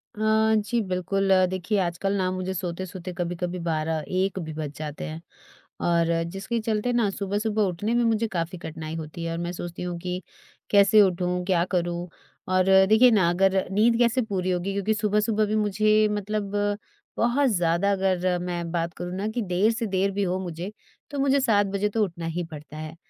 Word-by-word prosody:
हाँ, 220 +1 +3
जी 220 +3 0
बिल्कुल, 195 +1 -1 0.2
देखिए 185 +3 -1
आजकल 180 +3 -1
ना 185 -1 +1
मुझे 185 0 -3
सोते-सोते 180 0 -5
कभी-कभी 175 +1 -3
12:00-1:00 165 +4 -1
भी 160 -2 -5
बज 150 -2 -4
जाते 150 -1 -6
हैं। 160 +1 -6 0.6
और 170 -1 +3 0.3
जिसके 195 +4 -2
चलते 220 +2 -1
ना 230 -4 +2
सुबह-सुबह 205 +2 -1
उठने 205 +7 -2
में 240 0 +3
मुझे 225 0 +1
काफ़ी 175 0 -3
कठिनाई 160 -1 -6
होती 160 +1 -6
है 165 - -2
और 165 - -3
मैं 175 +1 -3
सोचती 175 0 -6
हूँ 175 -1 -3
कि, 180 +1 -4 0.5
कैसे 205 +1 +6
उठूँ, 180 -1 +1
क्या 180 -3 +2
करूँ, 175 0 -1 0.4
और 185 0 +3 0.3
देखिए 235 +3 +7
ना 190 -6 +4
अगर 190 +2 +2
नींद 230 +4 +3
कैसे 240 +2 +3
पूरी 185 -4 -1
होगी 180 +2 -1
क्योंकि 200 +2 0
सुबह-सुबह 210 +1 +1
भी 215 +1 -1
मुझे 215 +1 +3
मतलब 205 0 -2 0.7
बहुत 250 +4 +2
ज़्यादा 175 0 +2
अगर 185 -2 +1
मैं 175 -2 -3
बात 170 -1 -1
करूँ 180 +1 -5
ना 205 +2 -2
कि 235 +2 -2
देर 195 +3 +2
से 230 0 -2
देर 195 +1 +1
भी 200 +1 -1
हो 185 0 -1
मुझे, 175 +2 -5 0.4
तो 285 - -3
मुझे 275 0 +3
7:00 210 -6 +3
बजे 205 +1 +1
तो 215 0 +1
उठना 170 -3 -4
ही 170 +2 -2
पड़ता 150 0 -9
है। 155 +1 -7
190 Hz, 185 wpm, -25 LUFS, 175-210 Hz, 0.7 s, देखिए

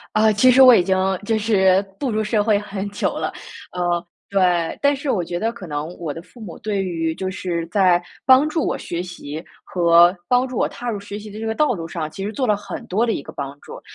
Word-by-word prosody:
啊， 215 0 +4
其 235 +5 +5
实 255 +2 +5
我 255 -1 +9
已 200 - +5
经 190 +1 +1 0.3
就 220 +1 +1
是 190 -3 +3 0.2
步 270 - -1
入 215 -1 0
社 215 0 +1
会 210 -1 +3
很 205 -1 -5
久 205 - -2
了， - - -2 0.4
呃， 175 -1 -1 0.2
对。 180 -4 +1
但 285 0 +4
是 275 0 -3
我 190 - +1
觉 175 +1 -4
得 225 +4 -1
可 200 -7 -10
能 145 0 -3
我 160 -4 -4
的 165 - -8
父 230 +7 -18
母 190 -6 -9
对 205 -2 -2
于 165 -3 -2
就 185 +2 -3
是 175 -3 -3
在 180 -2 +3 0.2
帮 260 +3 +6
助 310 -1 -1
我 - - -1
学 170 - -5
习 170 -3 -7 0.2
和 170 0 +5
帮 250 +1 +2
助 255 - -7
我 - - +1
踏 245 0 -5
入 210 - -3
学 200 0 -8
习 210 0 -8
的 210 - -9
这 225 - -4
个 220 - -1
道 300 0 +2
路 165 -4 -6
上， 160 -2 -4
其 195 - -6
实 210 - -3
做 255 +5 -2
了 210 -4 +2
很 205 - -8
多 220 +6 +1
的 225 - +1
一 - - -3
个 - - -10
帮 140 0 -6
助。 - - -10
200 Hz, 270 characters per minute, -21 LUFS, 175-225 Hz, 0.4 s, 我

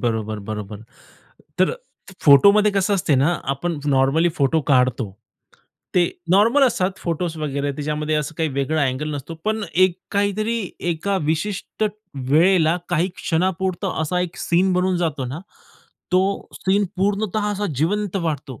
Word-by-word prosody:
बरोबर, 110 -2 -2
बरोबर. 105 0 -6 0.8
तर - - +3 0.5
फोटोमध्ये 200 +9 +7
कसं 195 +1 +1
असते 175 -6 +1
ना, 140 +6 +3
आपण 150 +5 -2
नॉर्मली 140 +4 +3
फोटो 145 +3 +2
काढतो. 125 -4 +2 0.8
ते 175 -1 +4 0.2
नॉर्मल 225 +9 +5
असतात 195 -6 0
फोटोस 170 0 -3
वगैरे, 145 -2 -2
त्याच्यामध्ये 150 +2 -2
असं 150 +1 -3
काही 160 -1 +1
वेगळा 140 +3 0
अँगल 145 +3 -2
नसतो, 145 +3 -6
पण 215 0 0
एक 185 0 +3
काहीतरी 210 +3 0 0.3
एका 195 +5 -1
विशिष्ट 180 +7 -2 0.5
वेळेला 165 +1 +4
काही 175 +1 +1
क्षणापुरता 185 +1 -1
असा 180 +3 -1
एक 180 -1 -4
सीन 185 +2 +2
बनून 180 0 +1
जातो 160 -6 -1
ना. 135 +6 -6 0.7
तो 190 +2 +1
सीन 200 +2 +1
पूर्णतः 205 +2 0
असा 205 +1 -2
जिवंत 200 +7 0
वाटतो. 155 - -3
170 Hz, 135 wpm, -21 LUFS, 145-190 Hz, 0.8 s, फोटोमध्ये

